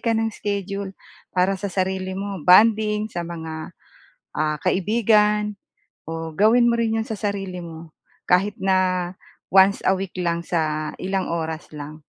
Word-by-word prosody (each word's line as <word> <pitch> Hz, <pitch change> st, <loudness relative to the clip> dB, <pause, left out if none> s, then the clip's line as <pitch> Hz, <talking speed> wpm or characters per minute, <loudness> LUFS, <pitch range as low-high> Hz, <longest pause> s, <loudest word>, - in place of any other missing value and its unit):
ka 230 Hz, -1 st, +1 dB
ng 225 Hz, 0 st, 0 dB
schedule 200 Hz, -1 st, -4 dB, 0.4 s
para 185 Hz, +2 st, +3 dB
sa 195 Hz, +1 st, -3 dB
sarili 190 Hz, 0 st, -2 dB
mo, 200 Hz, -1 st, -4 dB
bonding 210 Hz, +4 st, +4 dB
sa 175 Hz, -, -3 dB
mga, 160 Hz, -2 st, -7 dB, 0.6 s
ah, 150 Hz, -1 st, 0 dB
kaibigan, 210 Hz, +1 st, +2 dB, 0.5 s
o 165 Hz, 0 st, -5 dB
gawin 235 Hz, +7 st, +4 dB
mo 235 Hz, -, 0 dB
rin 225 Hz, -1 st, +1 dB
'yon -, -, -14 dB
sa 220 Hz, -3 st, -5 dB
sarili 195 Hz, -3 st, -3 dB
mo 165 Hz, -1 st, -9 dB, 0.4 s
kahit 195 Hz, +3 st, +3 dB
na 185 Hz, -2 st, +1 dB, 0.4 s
once 195 Hz, +1 st, +5 dB
a -, -, +4 dB
week 190 Hz, -1 st, -3 dB
lang 170 Hz, -2 st, -1 dB
sa 155 Hz, -3 st, -2 dB
ilang 190 Hz, 0 st, -2 dB
oras 160 Hz, -1 st, -3 dB
lang. 150 Hz, +1 st, -8 dB
190 Hz, 150 wpm, -23 LUFS, 170-210 Hz, 0.6 s, once